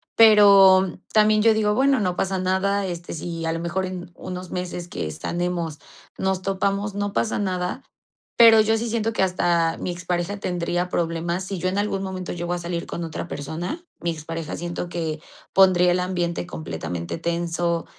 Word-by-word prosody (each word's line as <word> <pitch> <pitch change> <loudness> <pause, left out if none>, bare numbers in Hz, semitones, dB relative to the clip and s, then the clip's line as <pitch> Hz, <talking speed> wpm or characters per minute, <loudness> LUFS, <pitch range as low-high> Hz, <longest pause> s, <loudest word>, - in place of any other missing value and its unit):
Pero 200 -4 +7 0.2
también 215 0 +4
yo 225 0 +5
digo: 210 -1 +2
"Bueno, 270 +2 +3
no 180 -3 0
pasa 190 +1 -1
nada. 190 +2 0
Este, 175 -1 -5
si 165 0 -5
a 165 - 0
lo 165 - -2
mejor 170 +3 -2
en 180 -1 -7
unos 180 0 -7
meses 180 -1 -4
que 80 - -4
sanemos, 170 - -3 0.4
nos 190 -1 0
topamos, 195 +1 -1
no 205 0 -2
pasa 220 - 0
nada", 185 +4 -2 0.6
pero 225 -2 +8
yo 220 +1 +2
sí 235 +1 -3
siento 225 0 0
que 190 - +1
hasta 170 -3 +1
mi - - -3
expareja 175 +2 -3
tendría 175 -1 -2
problemas, 170 +2 -1
si 195 0 -4
yo 185 - -1
en 195 +2 -1
algún 195 -2 -1
momento 185 -1 -5
llego 175 0 -3
a 175 - -2
salir 170 0 -4
con 170 - -5
otra 165 +1 -5
persona, 170 - -5 0.2
mi 170 0 0
expareja 165 0 -5
siento 175 +1 -4
que 160 -3 -3 0.3
pondría 180 -2 +5
el 180 - +1
ambiente 175 - -2
completamente 85 - -5
tenso 170 0 -1
180 Hz, 175 wpm, -23 LUFS, 170-195 Hz, 0.6 s, pero